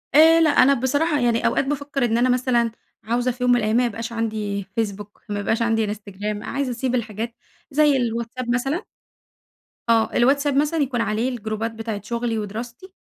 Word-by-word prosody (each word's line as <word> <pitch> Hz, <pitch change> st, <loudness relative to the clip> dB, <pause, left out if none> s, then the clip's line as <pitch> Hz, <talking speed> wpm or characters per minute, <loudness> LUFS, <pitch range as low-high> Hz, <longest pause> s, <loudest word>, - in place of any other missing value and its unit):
آآ 325 Hz, +2 st, +8 dB
لأ 320 Hz, -, +5 dB
أنا 275 Hz, -1 st, +5 dB
بصراحة 285 Hz, +4 st, +1 dB
يعني 235 Hz, -2 st, +1 dB
أوقات -, -, +1 dB
بافكر 285 Hz, -2 st, -1 dB
إن 230 Hz, -1 st, +1 dB
أنا 250 Hz, +2 st, +3 dB
مثلًا، 245 Hz, -2 st, +2 dB, 0.3 s
عاوزة 240 Hz, +3 st, 0 dB
في 250 Hz, +1 st, -6 dB
يوم 250 Hz, -, +4 dB
من 245 Hz, -, +5 dB
الأيام 215 Hz, -1 st, 0 dB
ما 250 Hz, -, +3 dB
يبقاش 230 Hz, 0 st, -4 dB
عندي 215 Hz, -3 st, -2 dB, 0.2 s
Facebook، 205 Hz, -2 st, -2 dB, 0.2 s
ما 205 Hz, 0 st, -2 dB
يبقاش 225 Hz, +3 st, 0 dB
عندي 225 Hz, -2 st, +1 dB
Instagram، 205 Hz, 0 st, -5 dB
عايزة 275 Hz, -2 st, -2 dB
أسيب 250 Hz, +1 st, -1 dB
الحاجات 230 Hz, 0 st, -3 dB, 0.4 s
زي 295 Hz, -1 st, +4 dB
الواتساب 235 Hz, +1 st, -3 dB
مثلًا 270 Hz, +7 st, -1 dB, 1.1 s
آه 225 Hz, -1 st, +3 dB
الواتساب 280 Hz, +3 st, +3 dB
مثلًا 300 Hz, +3 st, +1 dB
يكون 260 Hz, -5 st, 0 dB
عليه 220 Hz, +4 st, 0 dB
الجروبات 225 Hz, -2 st, -3 dB
بتاعة 225 Hz, -2 st, -5 dB
شغلي 235 Hz, +1 st, -2 dB
ودراستي، 235 Hz, -, -7 dB
235 Hz, 175 wpm, -22 LUFS, 225-265 Hz, 1.1 s, آآ